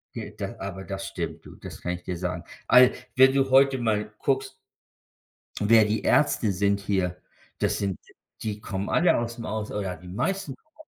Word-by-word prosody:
J -, -, -7 dB
da -, -, -5 dB
aber 95 Hz, -1 st, -6 dB
das 95 Hz, 0 st, -5 dB
stimmt, 85 Hz, -4 st, -5 dB
du, -, -, -12 dB
das -, -, -10 dB
kann 90 Hz, -, -2 dB
ich 90 Hz, 0 st, -8 dB
dir 90 Hz, -1 st, -4 dB
sagen. 90 Hz, -1 st, -3 dB, 0.2 s
Al 125 Hz, +1 st, +7 dB, 0.2 s
wenn 130 Hz, 0 st, +7 dB
du 135 Hz, -1 st, +2 dB
heute 135 Hz, 0 st, +5 dB
mal 105 Hz, -3 st, -1 dB
guckst 135 Hz, -1 st, -1 dB, 1.1 s
wer 110 Hz, +1 st, +6 dB
die 105 Hz, 0 st, -1 dB
Ärzte 120 Hz, -7 st, +3 dB
sind 100 Hz, +2 st, +1 dB
hier, 95 Hz, -3 st, -1 dB, 0.4 s
das -, -, +1 dB
sind 100 Hz, -3 st, -2 dB, 0.4 s
die 105 Hz, -2 st, -3 dB
kommen 100 Hz, -2 st, -4 dB
alle 175 Hz, +1 st, +4 dB
aus 120 Hz, 0 st, -3 dB
dem 115 Hz, -, -6 dB
Aus 110 Hz, 0 st, -3 dB
oder 95 Hz, -3 st, -3 dB
die 90 Hz, -, -14 dB
meisten 145 Hz, -, -2 dB
kommen. 310 Hz, -, -40 dB
105 Hz, 190 wpm, -26 LUFS, 95-130 Hz, 1.1 s, Al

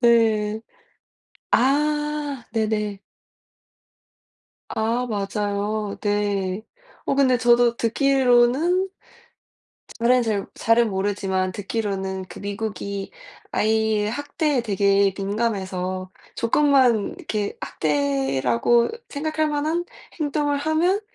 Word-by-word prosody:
네. 220 Hz, -3 st, +3 dB, 0.9 s
아 295 Hz, 0 st, +1 dB
네네. 210 Hz, -3 st, -1 dB, 1.7 s
아 230 Hz, +3 st, 0 dB
맞아요. 205 Hz, -1 st, -2 dB
네. 205 Hz, -1 st, -1 dB, 0.4 s
어 -, -, +1 dB
근데 270 Hz, -2 st, +3 dB
저도 240 Hz, 0 st, +4 dB
듣기로는 270 Hz, -, +3 dB, 1.1 s
잘은 245 Hz, +2 st, +4 dB
잘 210 Hz, -3 st, -1 dB
잘은 230 Hz, 0 st, +3 dB
모르지만 190 Hz, -1 st, -1 dB
듣기로는 195 Hz, -2 st, -3 dB
그 -, -, -11 dB
미국이 200 Hz, -1 st, -4 dB, 0.4 s
아이의 220 Hz, -1 st, +1 dB
학대에 290 Hz, +2 st, -1 dB
되게 200 Hz, -2 st, +2 dB
민감해서 190 Hz, -3 st, -2 dB, 0.2 s
조금만 250 Hz, -3 st, +3 dB
이렇게 215 Hz, -, -3 dB
학대라고 140 Hz, -, +1 dB, 0.2 s
생각할 310 Hz, +1 st, -1 dB
만한 305 Hz, +4 st, -1 dB, 0.3 s
행동을 290 Hz, -1 st, 0 dB
하면 320 Hz, +7 st, +1 dB
220 Hz, 190 characters per minute, -23 LUFS, 200-270 Hz, 1.7 s, 저도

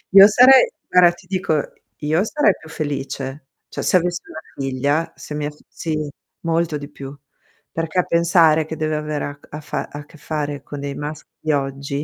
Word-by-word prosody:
Io 195 Hz, 0 st, +12 dB
sarei 255 Hz, -, +7 dB, 0.2 s
guarda 180 Hz, -1 st, +6 dB
ti 175 Hz, +1 st, -16 dB
dico, 185 Hz, -3 st, -1 dB, 0.4 s
io 155 Hz, +5 st, +1 dB
sarei 220 Hz, -, +3 dB
più 160 Hz, -, -14 dB
felice. 140 Hz, -2 st, -4 dB, 0.2 s
Cioè, -, -, -5 dB
se -, -, +4 dB
avessi 175 Hz, 0 st, -1 dB
una 160 Hz, -, -7 dB, 0.2 s
figlia, 140 Hz, +4 st, 0 dB
se -, -, -9 dB
mia 150 Hz, 0 st, -2 dB
f 150 Hz, -, -15 dB
sì, 160 Hz, -2 st, -3 dB, 0.4 s
molto 165 Hz, -2 st, 0 dB
di 145 Hz, 0 st, -8 dB
più. 140 Hz, -2 st, -9 dB, 0.6 s
Perché 165 Hz, +2 st, -1 dB
pensare 165 Hz, -2 st, +4 dB
che 160 Hz, -, -5 dB
deve 155 Hz, 0 st, -1 dB
avere 150 Hz, -1 st, -2 dB
a 145 Hz, 0 st, -7 dB
a 150 Hz, -, -7 dB
fa -, -, -4 dB
a 145 Hz, 0 st, -8 dB
che 155 Hz, -, -17 dB
fare 145 Hz, -1 st, -4 dB
con 145 Hz, -, -7 dB
dei 140 Hz, 0 st, -4 dB
maschi 150 Hz, +1 st, -6 dB
di 155 Hz, -, -1 dB
oggi, 140 Hz, 0 st, -2 dB
155 Hz, 185 wpm, -21 LUFS, 145-170 Hz, 0.6 s, Io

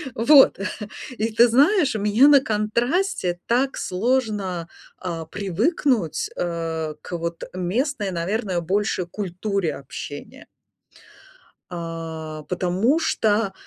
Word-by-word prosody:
Вот, 270 Hz, -1 st, +6 dB, 0.6 s
и 225 Hz, +1 st, -1 dB
ты 235 Hz, +2 st, +6 dB
знаешь, 285 Hz, -, +4 dB
у -, -, -1 dB
меня 210 Hz, +7 st, +5 dB
на 285 Hz, -2 st, +8 dB
контрасте 220 Hz, -, 0 dB
так 260 Hz, +3 st, +1 dB
сложно, 200 Hz, -5 st, -1 dB, 0.3 s
а, 165 Hz, -3 st, -5 dB
привыкнуть, 205 Hz, -, 0 dB
э, 165 Hz, -2 st, -2 dB
к 175 Hz, -, -5 dB
вот 170 Hz, 0 st, -4 dB
местной, 205 Hz, -, -1 dB
наверное, 180 Hz, +1 st, -2 dB
больше 190 Hz, +1 st, 0 dB
культуре 190 Hz, -3 st, -2 dB
общения. 145 Hz, -, -9 dB, 1.2 s
Э, 165 Hz, -2 st, -6 dB
потому 185 Hz, -, +1 dB
что 215 Hz, -9 st, +1 dB
200 Hz, 100 wpm, -23 LUFS, 170-240 Hz, 1.2 s, на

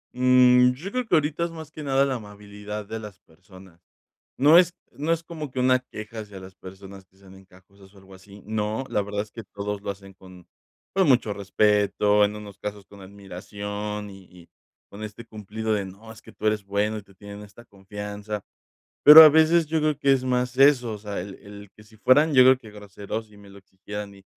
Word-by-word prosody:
Mm, 125 Hz, 0 st, +5 dB
yo 170 Hz, +10 st, -8 dB
creo 250 Hz, 0 st, -3 dB
que 175 Hz, -, +2 dB
ahorita 155 Hz, +2 st, 0 dB
es -, -, -5 dB
más 160 Hz, -2 st, -10 dB
que 155 Hz, -, -10 dB
nada 135 Hz, -1 st, +1 dB
la 135 Hz, -2 st, -2 dB
amabilidad 105 Hz, -1 st, -9 dB
de 110 Hz, +2 st, -6 dB
las 105 Hz, -3 st, -11 dB
personas, 90 Hz, +1 st, -19 dB, 0.5 s
no 150 Hz, +5 st, +6 dB
es 180 Hz, 0 st, +4 dB, 0.2 s
no 155 Hz, +4 st, -1 dB
es 165 Hz, 0 st, -4 dB
como 155 Hz, -4 st, -8 dB
que, 130 Hz, -, -5 dB
una 130 Hz, 0 st, +3 dB
queja 110 Hz, -3 st, -10 dB
hacia 100 Hz, -3 st, -10 dB
las 95 Hz, 0 st, -12 dB
personas 95 Hz, +1 st, -13 dB
que 95 Hz, -, -36 dB
sean 95 Hz, -1 st, -18 dB
encajosas 95 Hz, +1 st, -20 dB
o -, -, -20 dB
algo 95 Hz, 0 st, -17 dB
así, 100 Hz, +1 st, -16 dB
no, 110 Hz, +3 st, -3 dB
la 105 Hz, -, 0 dB
verdad 100 Hz, 0 st, -4 dB
es 105 Hz, 0 st, -10 dB
que 115 Hz, -3 st, -10 dB
todos 100 Hz, 0 st, -6 dB
lo -, -, -6 dB
hacen 100 Hz, -1 st, -9 dB
con 95 Hz, -2 st, -16 dB, 0.5 s
con 190 Hz, -2 st, +2 dB
mucho 125 Hz, -6 st, +3 dB
respeto 105 Hz, +1 st, +2 dB
en 105 Hz, +1 st, -4 dB
unos 105 Hz, -2 st, -11 dB
casos, 105 Hz, -1 st, -7 dB
con 100 Hz, +1 st, -16 dB
admiración 100 Hz, +2 st, -7 dB
y 95 Hz, -1 st, -13 dB
y 90 Hz, -2 st, -18 dB, 0.4 s
con 100 Hz, -, -12 dB
este 110 Hz, +2 st, -8 dB
cumplido 110 Hz, 0 st, -6 dB
de: 100 Hz, -2 st, -2 dB
"No 100 Hz, +4 st, -13 dB
es 110 Hz, -, -14 dB
que -, -, -16 dB
tú -, -, -9 dB
eres 105 Hz, -2 st, -1 dB
bueno", 105 Hz, +2 st, -1 dB
y 105 Hz, -, -9 dB
te 100 Hz, -, -22 dB
tienen 100 Hz, +1 st, -11 dB
esta 105 Hz, +3 st, -14 dB
confianza, 105 Hz, 0 st, -8 dB, 0.6 s
pero 150 Hz, +2 st, +12 dB
a 155 Hz, -, +9 dB
veces 160 Hz, +2 st, +4 dB
yo 160 Hz, +1 st, 0 dB
creo 150 Hz, -2 st, 0 dB
que 140 Hz, -2 st, +3 dB
es 130 Hz, -1 st, -1 dB
más 125 Hz, 0 st, -1 dB
eso, 130 Hz, -5 st, +4 dB
o -, -, -6 dB
sea, 105 Hz, -1 st, -6 dB
el 95 Hz, +2 st, -8 dB
el 100 Hz, -1 st, -13 dB
que 105 Hz, -, -17 dB
si 110 Hz, +1 st, -21 dB
fueran 145 Hz, +8 st, +3 dB
yo 130 Hz, -1 st, +7 dB
creo 130 Hz, 0 st, +6 dB
que 115 Hz, -5 st, -15 dB
groseros 105 Hz, +1 st, -8 dB
y -, -, -18 dB
me 100 Hz, -1 st, -16 dB
lo 100 Hz, -, -15 dB
exigieran 100 Hz, +2 st, -9 dB
y 95 Hz, -, -18 dB
105 Hz, 220 wpm, -24 LUFS, 100-125 Hz, 0.6 s, pero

